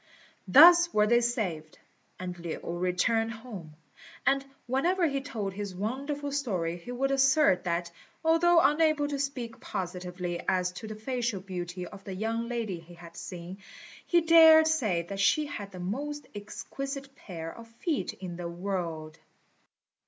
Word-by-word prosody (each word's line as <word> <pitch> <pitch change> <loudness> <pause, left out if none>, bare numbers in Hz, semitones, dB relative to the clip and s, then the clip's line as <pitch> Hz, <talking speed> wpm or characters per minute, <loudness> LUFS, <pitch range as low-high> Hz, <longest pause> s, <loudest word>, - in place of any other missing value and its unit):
Thus 345 - +8
were 210 0 +3
they 240 +2 +4
saved, 185 -10 -2 0.4
and 180 -1 -5
Lin 170 -2 -5
returned 185 +6 0
home; 210 -10 -10 0.5
and 275 0 +3 0.2
whenever 335 +9 +1
he 275 -2 -2
told 215 -8 -4
his 200 -1 -5
wonderful 280 +8 -3
story 185 -12 -1
he 180 +8 -9
would 270 +2 0
assert 270 -7 +4
that, 170 0 -1 0.3
although 335 +1 +5
unable 310 -2 +3
to 285 -1 -3
speak 255 -5 -4
positively 180 -2 -4
as 180 -1 +1
to 185 +5 -8
the 215 - -6
facial 235 -1 -2
beauty 180 -1 -6
of 195 +2 -11
the 195 -1 -6
young 225 +3 -2
lady 225 -7 -3
he 170 +1 -14
had 170 -1 -13
seen, 180 +1 -8 0.5
he 345 -1 +4
dared 320 -1 +8
say 225 - +1
that 195 +3 -7
she 300 +9 +3
had 205 -9 -7
the 185 - -9
most 285 +11 -4
exquisite 275 +6 -6
pair 165 - -8
of 230 0 -11
feet 275 +7 -2
in 180 -3 -7
the 175 -1 -5
world. 170 -4 -4
215 Hz, 150 wpm, -29 LUFS, 180-275 Hz, 0.5 s, Thus